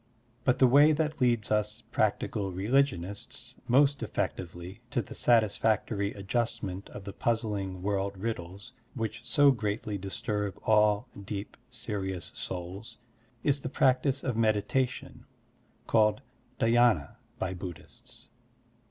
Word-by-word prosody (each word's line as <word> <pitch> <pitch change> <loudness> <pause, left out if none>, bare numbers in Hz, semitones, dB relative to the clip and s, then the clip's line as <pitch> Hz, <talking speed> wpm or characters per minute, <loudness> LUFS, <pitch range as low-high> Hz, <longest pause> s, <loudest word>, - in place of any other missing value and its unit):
But 125 - +3
the 130 - +6
way 145 +5 +6
that 155 -1 -1
leads 120 -4 +2
us 105 +1 0
practical 105 -1 0
religionists 115 +3 -1
most 140 +2 +4
effectively 90 -2 -4
to 125 -5 0
the - - -10
satisfactory 110 -2 +2
adjustment 100 -2 -2
of 100 - -9
the 100 - -7
puzzling 105 -5 -2
world 100 -1 -1
riddles 100 +2 -5 0.2
which 110 -2 -4
so 140 +4 +5
greatly 105 -3 -2
disturb 100 +1 -3
all 105 +1 +3 0.2
deep, 100 +1 -5
serious 95 -3 -4
souls 90 +4 -6 0.5
is 145 -1 +2
the 130 - -5
practice 130 +1 +2
of 130 -3 -1
medita 110 +3 +2
tion, 130 - -11 0.6
called 105 +2 +3 0.4
Dhy^na* 115 - +3 0.2
by 95 - -2
Buddhists. 90 -3 -10
110 Hz, 115 wpm, -29 LUFS, 100-120 Hz, 0.6 s, the